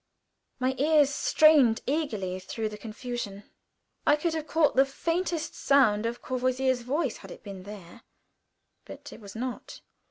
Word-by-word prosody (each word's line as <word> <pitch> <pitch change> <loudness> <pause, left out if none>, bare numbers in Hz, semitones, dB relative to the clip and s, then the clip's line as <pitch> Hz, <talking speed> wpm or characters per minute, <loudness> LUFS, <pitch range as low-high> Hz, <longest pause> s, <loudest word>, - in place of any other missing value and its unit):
My 255 0 0
ear 300 +1 +5
strained 280 -3 +4
eagerly 215 - -2
through 215 +4 -4
the 210 - -8
confusion. 220 -2 -6 0.6
I 295 - +5
could 320 +2 -1
have 315 -1 -4
caught 320 -2 +2
the 265 - +6
faintest 330 +4 -2
sound 230 -6 +3
of 235 +1 -6
Courvoisier's 255 0 0
voice 270 +2 -1
had - - -13
it - - -11
been 200 -3 -8
there, 205 +1 -11 0.8
but - - -11
it - - -13
was 200 0 -11
not. 250 +2 -6
255 Hz, 150 wpm, -28 LUFS, 215-295 Hz, 0.8 s, the